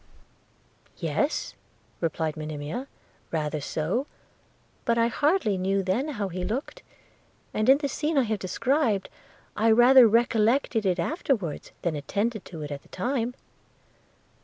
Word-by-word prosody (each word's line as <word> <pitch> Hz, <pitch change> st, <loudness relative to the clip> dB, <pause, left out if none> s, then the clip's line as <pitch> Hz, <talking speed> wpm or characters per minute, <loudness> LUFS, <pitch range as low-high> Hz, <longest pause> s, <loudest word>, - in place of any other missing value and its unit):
'Yes,' -, -, -1 dB, 0.5 s
replied 160 Hz, -1 st, -1 dB
Monimia, 155 Hz, -, -5 dB, 0.4 s
'rather 155 Hz, -2 st, -2 dB
so; 175 Hz, -, -2 dB, 0.8 s
but 235 Hz, 0 st, +1 dB
I 230 Hz, 0 st, +3 dB
hardly 285 Hz, -, +1 dB
knew 195 Hz, +1 st, +1 dB
then 190 Hz, +10 st, 0 dB
how 200 Hz, -2 st, -1 dB
he 180 Hz, 0 st, -4 dB
looked 235 Hz, +9 st, -4 dB, 0.4 s
– -, -, -36 dB
and 215 Hz, +3 st, +1 dB
in 270 Hz, -, +8 dB
the 290 Hz, -1 st, -2 dB
scene 300 Hz, +2 st, -1 dB
I 270 Hz, -, +5 dB
have 215 Hz, -3 st, -2 dB
described, 230 Hz, -, 0 dB, 0.5 s
I 225 Hz, +2 st, +3 dB
rather 240 Hz, +2 st, +8 dB
recollected 230 Hz, 0 st, +2 dB
it 180 Hz, -1 st, +2 dB
afterwards, 205 Hz, -, -2 dB
than 170 Hz, -3 st, 0 dB
attended 205 Hz, +9 st, -2 dB
to 160 Hz, -4 st, -7 dB
it 145 Hz, -, -6 dB
at 140 Hz, -1 st, -5 dB
the -, -, -24 dB
time.' 245 Hz, +4 st, -2 dB
215 Hz, 135 wpm, -26 LUFS, 175-250 Hz, 0.8 s, in